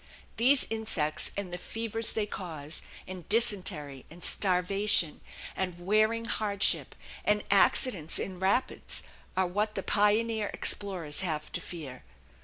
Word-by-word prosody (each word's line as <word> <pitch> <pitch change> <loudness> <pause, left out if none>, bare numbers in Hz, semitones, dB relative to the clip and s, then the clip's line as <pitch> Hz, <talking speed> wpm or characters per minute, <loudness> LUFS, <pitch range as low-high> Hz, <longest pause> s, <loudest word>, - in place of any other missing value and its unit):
These 260 +4 +5
insects, 205 -9 0
and 190 -3 -4
the 175 - -4
fevers 225 +2 -3
they 215 - -1
cause, 165 -7 -5 0.3
and 185 -3 -9
dysentery 185 - +1
and 170 +2 -13
starvation 185 -2 +2 0.3
and 180 -2 -3
wearing 215 +3 +2
hardship 205 -3 +1 0.3
and 210 0 +1
accidents 200 - +3
in 185 -2 -5
rapids 195 +7 0 0.3
are 190 - +3
what 205 +4 -2
the 195 - -3
pioneer 215 +1 +2
explorers 180 -7 0
have 155 -5 -2
to - - -3
fear. 145 -7 -8
195 Hz, 125 wpm, -29 LUFS, 175-215 Hz, 0.3 s, These